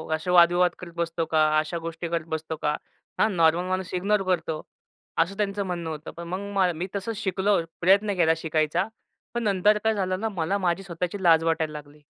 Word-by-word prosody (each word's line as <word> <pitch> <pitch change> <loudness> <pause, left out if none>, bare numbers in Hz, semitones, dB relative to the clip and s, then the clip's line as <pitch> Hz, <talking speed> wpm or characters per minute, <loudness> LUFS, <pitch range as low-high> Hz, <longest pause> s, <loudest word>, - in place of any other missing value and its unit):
असे 160 +3 -5
वाद-विवाद 175 0 +5
करत 175 -2 -9
बसतो 170 0 -1
का? 155 -1 +3
अशा 155 +2 -2
गोष्टी 165 +1 -5
करत 165 -1 -2
बसतो 160 0 -5
का? 150 - +1 0.4
हां, 215 - +3
नॉर्मल 170 +2 +3
माणूस 185 0 -2
इग्नोर 195 +2 +1
करतो. 165 -4 0 0.6
असं 185 +5 +1
त्यांचं 200 -1 -1
म्हणणं 170 -3 -3
होतं. 155 0 -6
पण 170 - -7
मग 190 0 0
मी 175 +4 -3
तसंच 200 +2 -3
शिकलो, 190 +1 +2 0.2
प्रयत्न 200 +3 +4
केला 160 -2 +4
शिकायचा. 160 +4 0 0.5
पण 240 0 -2
नंतर 205 0 +3
काय 220 0 +3
झालं 185 -3 -1
ना, 225 +1 -1
मला 185 0 -1
माझी 185 -1 0
स्वतःची 180 +1 -4
लाज 165 -2 +5
वाटायला 160 -1 0
लागली. 150 0 -10
175 Hz, 190 wpm, -25 LUFS, 165-195 Hz, 0.6 s, वाद-विवाद